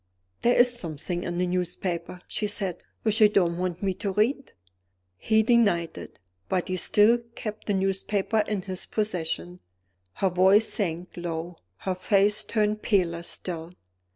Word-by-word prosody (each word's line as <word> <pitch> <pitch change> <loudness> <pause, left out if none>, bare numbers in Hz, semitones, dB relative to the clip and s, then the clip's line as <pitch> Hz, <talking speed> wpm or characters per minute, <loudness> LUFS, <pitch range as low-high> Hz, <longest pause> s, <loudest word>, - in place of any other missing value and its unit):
"There 240 - +3
is 245 0 +6
something 175 -4 -3
in 175 0 -3
the 180 - +1
newspaper," 180 -1 -3
she 215 - -2
said, 195 -4 -2 0.3
"which 220 0 +3
you 210 - +8
don't 175 -4 +1
want 180 0 -3
me 190 -1 +1
to 195 +2 -3
read." 235 +8 0 0.6
He 220 - +2
denied 205 -8 +2
it - - -10 0.3
but 185 -1 -1
he 185 - -1
still 215 +6 +4 0.2
kept 215 -1 -6
the 205 - +1
newspaper 195 +2 0
in 205 -3 -2
his 185 -1 -4
own - - -27
possession. 160 - -2 0.5
Her 190 - 0
voice 190 +5 +5
sank 180 -3 -2
low; 170 0 -5 0.2
her 190 - -1
face 200 +3 +2
turned 215 -1 0
paler 175 -5 +1
still. 170 0 -4
190 Hz, 155 wpm, -26 LUFS, 175-210 Hz, 0.6 s, you